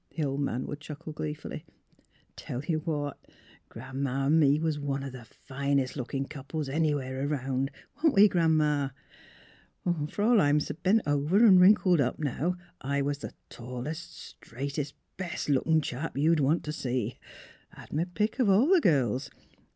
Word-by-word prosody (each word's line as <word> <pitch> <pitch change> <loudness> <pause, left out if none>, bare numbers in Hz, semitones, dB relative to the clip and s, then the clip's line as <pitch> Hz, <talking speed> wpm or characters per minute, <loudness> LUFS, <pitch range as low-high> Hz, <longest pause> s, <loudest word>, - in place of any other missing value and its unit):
the 160 - 0
old 140 -1 -1
man 130 -3 -1
would 145 - -6
chuckle 150 +1 -8
gleefully. 150 0 -5 0.3
' - - -36
* - - -35
Tell 125 +3 -6
ye 170 - 0
what, 150 -3 -3 0.5
Gran 130 +4 -7
'ma 135 0 -1
an' 155 +4 +4
me 145 -1 +4
was 160 -2 -1
one 140 -1 -2
of 135 - -5
the 125 -2 -10
finest 135 +2 -2
lookin* 135 +1 -3
couples 145 +1 -5
anywheres 140 -2 -1
around; 135 -2 -1 0.3
wa'n't 315 -2 +3
we, 200 +2 +8
Gran 165 -4 +2
'ma? 150 -2 +1 1.2
Fer 205 - -3
all 230 0 +5
I'm 145 0 +3
s' 150 0 0
bent 210 +4 +3
over 150 +9 +3
an' 190 -4 +8
wrinkled 180 -3 +5
up 125 - 0
now 155 +4 -1 0.3
I 140 +1 -1
was 145 0 -2
the - - -8
tallest, 125 +7 -6
straightest, 140 +4 -6 0.2
best 180 -5 -4
lookin' 155 +3 +3
chap 140 +1 -5
ye'd 160 +3 +3
want 145 +4 +2
t' 150 - -4
see. 125 -5 -3 0.5
Had - - -13
m' 155 - +2
pick 215 +4 0
of 240 -6 +3
all 215 - +5
the 365 - +5
girls. 130 - +1
145 Hz, 175 wpm, -29 LUFS, 135-160 Hz, 1.2 s, we